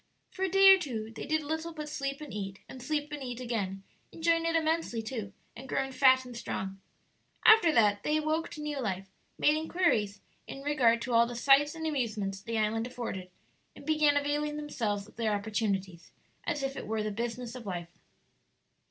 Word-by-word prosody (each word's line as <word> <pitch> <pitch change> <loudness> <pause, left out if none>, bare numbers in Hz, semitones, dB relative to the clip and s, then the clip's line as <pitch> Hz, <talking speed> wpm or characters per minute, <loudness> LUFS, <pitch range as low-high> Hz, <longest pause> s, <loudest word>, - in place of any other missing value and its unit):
For - - -10
a 380 - +2
day 390 +1 +8
or 385 - +4
two 225 -9 -4
they - - -6
did 310 +1 +1
little 320 +3 -3
but 305 -1 -6
sleep 275 -1 -4
and 300 - -8
eat, 195 -2 -5
and 260 - -10
sleep 295 +2 -2
and 295 -1 -5
eat 245 -2 -5
again, 200 -6 -3 0.3
enjoying 330 0 +1
it 330 - +1
immensely, 320 -8 0
too, 220 -3 -5 0.2
and 265 +3 -10
growing 270 0 -1
fat 260 -1 +5
and 250 -1 -9
strong. 195 -4 -5 0.6
After 440 -7 +8
that 205 -5 +4
they 305 +6 +1
woke 310 +2 -1
to 300 - -7
new 295 -2 -3
life, 195 -3 -3 0.3
made 300 - +4
inquiries 310 - +1 0.3
in 275 - -8
regard 250 -6 +3
to 250 - -3
all 235 0 +5
the 240 - -6
sights 280 +5 +4
and 320 0 -5
amusements 215 -10 -2
the 230 +2 -3
island 220 +2 0
afforded, 230 -7 -5 0.5
and - - -13
began 305 -2 +3
availing 295 +1 -1
themselves 215 -9 -2
of - - -19
their 220 -2 +1
opportunities, 200 -4 -2 0.4
as 295 -4 -1
if 270 0 -2
it - - -6
were 220 0 -1
the 215 - -2
business 235 +2 -4
of 245 -4 -9
life. 175 -2 -5
255 Hz, 195 wpm, -30 LUFS, 215-300 Hz, 0.6 s, day